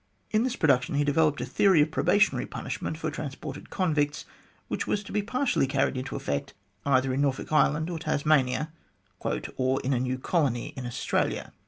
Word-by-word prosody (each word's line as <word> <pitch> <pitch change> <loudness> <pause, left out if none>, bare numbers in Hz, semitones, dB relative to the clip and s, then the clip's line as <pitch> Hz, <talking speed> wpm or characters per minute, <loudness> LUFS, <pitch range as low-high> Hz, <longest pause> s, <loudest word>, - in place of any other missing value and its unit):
In 215 - +3
this 255 0 -1
production 140 -3 +2
he 145 - +3
developed 145 +1 +2
a - - -2
theory 190 -5 +4
of 150 +1 +3
probationary 205 +6 +2
punishment 160 - -4
for 160 -1 -3
transported 145 -1 -6
convicts, 150 -6 0 0.4
which - - -3
was 205 - 0
to - - -10
be 210 - +1
partially 245 - +1
carried 135 0 +1
into 130 0 -4
effect 70 0 -3 0.3
either 130 -1 +3
in 135 - 0
Norfolk 140 0 -1
Island, 155 +1 +3
or 170 -2 -4
Tasmania, 150 -1 +1 0.4
" 90 - -43 0.4
or 130 +1 +1
in 135 +1 0
a 125 - +1
new 130 +1 -1
colony 130 -4 0
in 125 -2 -5
Australia." 120 - -1
145 Hz, 180 wpm, -27 LUFS, 130-160 Hz, 0.4 s, theory